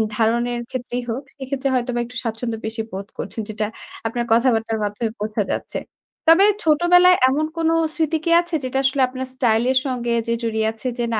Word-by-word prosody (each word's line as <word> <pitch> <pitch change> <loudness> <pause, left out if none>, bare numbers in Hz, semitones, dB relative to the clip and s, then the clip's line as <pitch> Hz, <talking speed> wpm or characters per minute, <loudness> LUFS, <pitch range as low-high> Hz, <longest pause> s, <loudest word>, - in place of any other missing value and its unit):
ধারণের 235 +2 +1
ক্ষেত্রেই 245 -1 -4
হোক, 245 +5 -2 0.2
সেক্ষেত্রে 270 0 -2
হয়তোবা 245 -1 -1
একটু 250 +1 -13
স্বাচ্ছন্দ্য 225 0 -3
বেশি 225 +1 -3
বোধ 195 +1 -6
করছেন, 225 - -4
যেটা 215 0 -2 0.4
আপনার 240 +1 -2
কথাবার্তার 225 -2 +2
মাধ্যমে 205 +2 -2
বোঝা 210 0 -1
যাচ্ছে। - - -4 0.5
তবে 375 +5 +7 0.2
ছোটবেলায় 355 +3 +5
এমন 300 +3 +1
কোনো 325 0 +2 0.2
স্মৃতি 320 0 +1
কি 335 - +1
আছে? 345 -1 -4
যেটা 260 +1 -2
আসলে 265 0 +2
আপনার 260 +1 -5
স্টাইলের 245 +1 +2
সঙ্গে 245 -3 -2 0.2
যে 235 - +1
জড়িয়ে 220 -1 0
আছে 225 +3 -7
যে, - - +1
"না, - - +1
245 Hz, 175 wpm, -21 LUFS, 225-270 Hz, 0.5 s, তবে